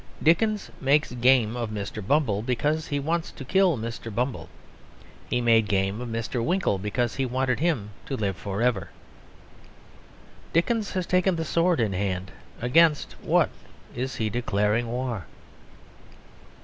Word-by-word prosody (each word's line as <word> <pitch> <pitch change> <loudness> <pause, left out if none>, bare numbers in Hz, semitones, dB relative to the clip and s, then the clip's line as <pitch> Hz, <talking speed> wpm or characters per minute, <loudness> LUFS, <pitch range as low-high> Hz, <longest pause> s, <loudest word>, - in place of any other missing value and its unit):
Dickens 205 +6 +2
makes 145 +3 +3
game 125 -2 +3
of 120 -2 -3
Mr. 105 0 -5
Bumble 135 -8 +2
because 145 +7 0
he 145 - -1
wants 165 +4 -1
to 135 - -9
kill 185 -1 +3
Mr. 115 0 -5
Bumble; 125 +4 -2 0.8
he 125 - +1
made 115 -2 +4
game 100 +2 0
of 125 - -5
Mr. 115 +1 -2
Winkle 175 - +1
because 110 +4 -1
he 135 - +1
wanted 130 0 0
him 140 -11 0 0.2
to 135 - -2
live 100 -3 -1
for 100 +4 -3
ever. 120 -6 +1 1.6
Dickens 210 +5 +1
has 185 -1 -1
taken 185 +1 +2
the 165 -1 -2
sword 170 0 +2
in 110 -4 +1
hand; 95 -1 -2 0.3
against 150 +5 +3
what - - +2 0.4
is 130 +2 -3
he 110 - -1
declaring 105 0 0
war? 120 -5 -3
125 Hz, 145 wpm, -26 LUFS, 110-155 Hz, 1.6 s, made